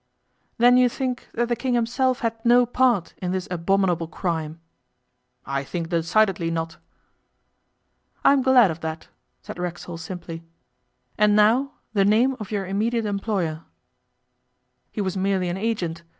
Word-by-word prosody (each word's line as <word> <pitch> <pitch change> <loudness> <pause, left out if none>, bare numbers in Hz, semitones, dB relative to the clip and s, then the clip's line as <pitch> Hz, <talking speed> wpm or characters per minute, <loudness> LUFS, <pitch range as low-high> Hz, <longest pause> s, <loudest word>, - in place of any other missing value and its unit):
'Then 245 +1 +6
you 250 -1 +5
think 255 0 -4
that 240 0 -1
the 240 - 0
King 250 0 -1
himself 250 +3 0
had 225 -1 -3
no 245 +1 +5
part 240 -7 +1
in 180 -1 -2
this 185 +1 -3
abominable 180 -1 +1
crime?' 160 -1 -3 0.9
'I 140 0 -2
think 170 0 -4
decidedly 170 +1 +1
not.' 165 0 -3 1.5
'I - - +7
am 280 - +2
glad 250 -7 +5
of 160 - -7
that,' 160 0 -6 0.3
said - - -8
Racksole 175 -1 -5
simply. 165 -1 -7 0.8
'And 210 0 +4
now, 230 +7 +3 0.2
the 200 -2 +3
name 230 +7 +3
of 215 - -7
your 205 -3 -2
immediate 220 +4 -1
employer.' 195 -6 -2 1.3
'He 215 - -3
was 190 -1 -2
merely 190 -1 0
an 175 - -3
agent. 190 -6 -2
195 Hz, 145 wpm, -23 LUFS, 170-235 Hz, 1.5 s, I